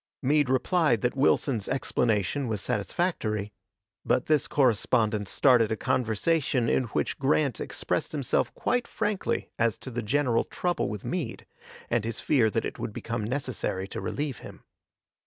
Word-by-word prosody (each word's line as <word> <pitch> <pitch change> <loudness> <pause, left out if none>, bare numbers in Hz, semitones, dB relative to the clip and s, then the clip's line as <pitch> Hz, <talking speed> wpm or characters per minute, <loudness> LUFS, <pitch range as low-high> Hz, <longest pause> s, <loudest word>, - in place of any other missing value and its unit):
Meade 145 0 +3
replied 130 - +2
that 125 +1 0
Wilson's 130 -5 +2
explanation 120 0 0
was 110 -3 -2
satisfactory; 105 - -1 0.5
but 125 - +1
this 155 -3 +2
correspondence 110 -4 +2
started 120 -5 +4
a - - +2
conversation 125 +3 +1
in 130 - +2
which 115 - -2
Grant 140 -2 +1
expressed - - -2
himself 140 -5 0
quite 245 -1 0
frankly 210 -3 -2
as 115 -2 +2
to 130 - -8
the 120 0 -2
general 120 +1 +1
trouble 175 - -1
with 105 -1 -6
Meade, 165 -10 -3 0.4
and 120 -2 +1
his 115 0 -3
fear 125 -7 +3
that - - -1
it - - -5
would - - -4
become 115 0 -3
necessary 120 -6 -3
to - - -5
relieve 145 -4 -3
him. - - -12
125 Hz, 150 wpm, -27 LUFS, 110-145 Hz, 0.5 s, started